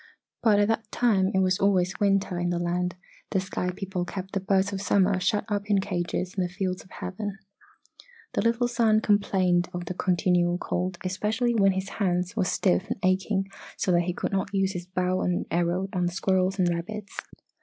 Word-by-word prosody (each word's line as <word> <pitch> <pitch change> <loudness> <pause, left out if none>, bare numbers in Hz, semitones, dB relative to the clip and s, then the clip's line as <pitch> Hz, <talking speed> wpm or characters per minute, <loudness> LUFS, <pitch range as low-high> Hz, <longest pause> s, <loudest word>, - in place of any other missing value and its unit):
But 215 -3 +4
at 205 0 +4
that 225 -1 -1
time 200 -6 +2
it 190 - +2
was 185 -1 +2
always 190 -2 +2
winter 195 -3 +1
in 175 0 0
the 175 - 0
land 175 0 -1 0.3
the 195 - +1
sky 185 -1 -3
people 185 0 -3
kept 190 +1 -6
the 195 - +1
Birds 195 +1 +1
of 190 - -3
Summer 195 -1 +3
shut 200 +3 +1
up 205 -1 -2
in 200 -1 +4
cages 180 0 -2
in 190 - 0
the 180 - -1
Fields 185 -1 -3
of - - -21
Heaven. 195 +2 -5 1.0
"The - - +1
little 230 +1 +2
son 230 -3 +3
complained 185 -4 +2
of 175 0 -4
the 180 - -4
continual 175 -1 +2
cold, 180 0 -2
especially 215 +6 0
when 195 -4 +4
his 190 +1 -3
hands 180 -1 0
were - - +1
stiff 185 0 +1
and - - -2
aching 190 +1 +1 0.3
so 185 - 0
that 175 -1 +3
he - - 0
could - - -2
not 195 -1 -1
use 195 0 +2
his 180 -2 -6
bow 185 0 0
and 180 0 0
arrow 175 +3 +1
on 180 -2 +1
the - - -2
squirrels 190 0 +1
and 185 -2 +2
rabbits. 195 +5 -4
190 Hz, 200 wpm, -26 LUFS, 180-200 Hz, 1.0 s, But